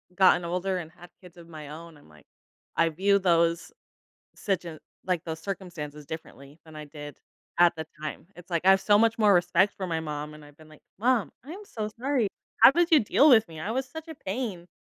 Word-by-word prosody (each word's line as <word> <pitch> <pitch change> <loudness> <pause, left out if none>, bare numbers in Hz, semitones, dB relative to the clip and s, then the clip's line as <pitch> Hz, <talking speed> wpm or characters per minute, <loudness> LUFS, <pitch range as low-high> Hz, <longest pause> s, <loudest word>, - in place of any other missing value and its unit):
gotten 185 -2 +4
older 180 +2 -2
and 165 -3 -7
had 175 +2 -15
kids 180 -1 -16
of 170 -1 -13
my 155 -3 -10
own, 165 +1 -10
I'm 145 - -20
like, 75 0 -20 0.5
I 165 0 +3
view 200 +5 +2
those, 170 - +1 0.7
situa 175 -5 -3 0.3
like, 180 -3 -1
those 160 -2 -5
circumstances 165 -5 -7
differently 145 -1 -10
than 160 -1 -14
I 150 0 -8
did 145 0 -10 0.4
at 175 0 +5
the 160 0 -5 0.2
time. 155 +2 -6
It's 175 +1 -14
like, 170 0 -2
I - - +7
have 195 0 +4
so 205 -1 +4
much 230 +1 +3
more 210 -2 +5
respect 180 +2 +3
for 190 - -5
my 165 -2 -1
mom, 150 -1 -5
and 150 0 -13
I've 145 0 -18
been 155 -1 -17
like, 155 - -17 0.2
"Mom, 240 -1 +1
I 295 - -9
am 405 +4 -9
so 215 - -5
sorry, 260 -3 +1 0.3
how - - +10
did 345 +3 +2
you 315 - +7
deal 280 +6 +4
with 225 -6 +6
me? 160 -2 -10
I 200 +7 -3
was 260 +2 -2
such 320 +5 -9
a 320 - -8
pain." 195 -7 -5
175 Hz, 225 wpm, -27 LUFS, 160-205 Hz, 0.7 s, how